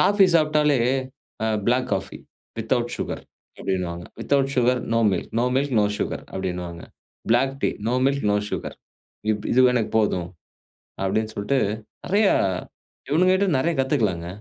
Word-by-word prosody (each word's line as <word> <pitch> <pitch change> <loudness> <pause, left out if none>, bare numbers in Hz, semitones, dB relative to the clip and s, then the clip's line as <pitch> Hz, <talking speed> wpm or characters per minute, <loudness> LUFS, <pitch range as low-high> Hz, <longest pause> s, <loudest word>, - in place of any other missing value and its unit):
Coffee 200 -1 +5
சாப்டாலே, 150 -3 +3 0.7
அ - - +1 0.2
black 125 +1 +2
coffee 95 - -5 0.4
without 120 +1 -1
sugar - - -4 0.4
அப்டின்னுவாங்க. 85 -2 -2 0.2
Without 135 -1 +1
sugar, 125 0 +3
no 115 - +3
milk, 90 - -3
no 125 - +2
milk, 140 -2 0
no 105 - +3
sugar - - -3
அப்டின்னுவாங்க. 90 -2 -4 0.5
Black 135 +3 +2
tea, - - +3 0.2
no 125 - +1
milk, 140 -3 0
no - - +3
sugar. - - -4 0.5
இப்படி 105 -1 -2
இது 130 0 +6
எனக்கு 115 -3 0
போதும். 90 -5 0 0.8
அப்படின்னு 110 +3 0
சொல்ட்டு, 120 +7 0 0.5
நிறையா 200 +2 +3 0.8
இவனுங்க 180 +5 +4
கிட்ட 200 +1 +1
நிறையா 165 +5 +1
கத்துக்கலாங்க! 110 - 0
125 Hz, 140 wpm, -23 LUFS, 100-140 Hz, 0.8 s, இது